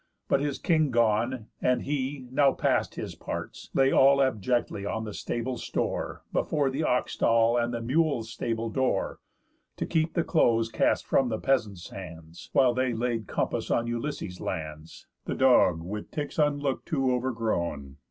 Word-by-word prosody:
But - - +3
his 145 -1 -1
king 155 -4 +2
gone, 115 0 +1 0.2
and 125 0 +2
he, 135 -1 -3
now 135 0 +4
past - - 0
his - - -5
parts, - - -6
Lay 135 0 +4
all 140 +1 +6
abjectly 120 -4 0
on 110 +2 -2
the 105 -2 -6
stable's 120 +4 -3
store, - - -3
Before 145 -3 +1
the 135 +4 -2
oxstall, 115 -3 +2
and 120 - -2
mules' 135 -4 +1
stable 115 0 -3
door, 130 +2 0 0.6
To - - -2
keep 160 0 0
the 170 - +2
clothes 115 -10 +2
cast 110 - +1
from 130 -2 +2
the 110 - -1
peasants' 105 -9 -1
hands, 85 -3 -10
While 130 -2 +4
they 130 -1 0
laid 115 -2 -2
compass - - -2
on 115 - +1
Ulysses' 120 -6 -4
lands, 80 -2 -6 0.2
The - - -2
dog, 120 -11 +4
with 105 +4 -6
ticks 150 +1 -4
(unlook'd 145 -2 0
to) 135 -5 +1
overgrown. 110 - -2
120 Hz, 155 wpm, -27 LUFS, 110-135 Hz, 0.6 s, all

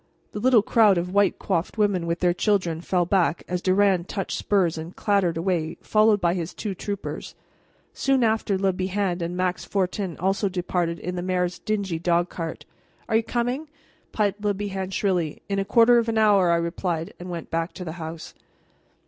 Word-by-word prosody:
The - - -5
little 240 -2 +4
crowd 215 -4 +4
of 180 +2 -2
white 200 -1 +3
coiffed 180 +2 -2
women 200 -5 +1
with 170 +1 -2
their 175 -1 +3
children 180 -4 0
fell 180 0 +1
back 180 -2 +1
as 180 0 -2
Durand 185 -1 +2
touched 195 -3 -3
spurs 190 -5 +1
and 160 +2 -7
clattered 195 -5 +1
away 170 -2 -1
followed 215 -1 +3
by 170 -2 +2
his 175 -2 -4
two 210 -3 -4
troopers. 200 +2 -6 0.6
Soon 270 -2 +1
after 220 -3 +1
Le 190 0 +1
Bihan 185 -1 -1
and 170 +1 -3
Max 185 0 -1
Fortin 190 -2 -2
also 195 +3 0
departed 175 -2 -1
in 180 +3 -5
the - - -2
mayor's 180 -1 -1
dingy 195 -4 -2
dog 175 +1 +1
cart. 165 -2 -5 0.4
"Are 220 - +3
you - - +2
coming?" 245 +6 -2 0.4
piped 205 -1 -1
Le 205 -1 +1
Bihan 195 -2 -4
shrilly. 185 -5 -1
"In 200 0 -1
a 195 - -1
quarter 235 +2 +5
of 230 0 -1
an 225 - -1
hour," 205 -4 +4
I 170 - +4
replied, 170 0 -2
and 180 +1 -8
went 170 -2 -6
back 165 +1 -1
to 180 - -7
the 160 - -4
house. 160 0 -7
185 Hz, 190 wpm, -24 LUFS, 175-205 Hz, 0.6 s, quarter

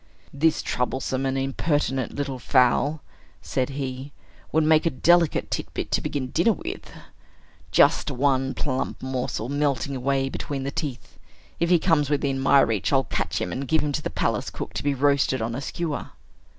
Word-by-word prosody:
"This 155 +3 +2
troublesome 130 +1 -1
and 135 0 -1
impertinent 135 -1 -1
little 135 -2 -3
fowl," 130 +4 +2 0.4
said 130 0 -2
he, 135 0 -5 0.4
"would 160 +1 +3
make 155 +1 +4
a - - +4
delicate 170 +2 +2
titbit - - -4
to - - +2
begin 130 -3 -3
dinner 215 +7 +3
with. - - -7 0.8
Just - - +4
one 135 0 +1
plump 130 -2 -2
morsel, 125 -4 -3
melting 140 -1 0
away 135 +1 0
between 135 0 -4
the 140 - -3
teeth. 145 -6 -6 0.4
If 170 - +1
he 180 - +6
comes 160 -4 +2
within 140 -2 0
my 135 +1 +5
reach, 110 -6 0
I'll 135 -1 +4
catch - - -2
him, - - -3
and 135 +1 -4
give 160 +3 +3
him 150 - -1
to - - -2
the - - -3
palace - - -1
cook - - -7
to - - -4
be 145 -1 +1
roasted 140 -1 +2
on 115 +1 -2
a 130 - -4
skewer." 160 0 -4
140 Hz, 175 wpm, -25 LUFS, 130-150 Hz, 0.8 s, he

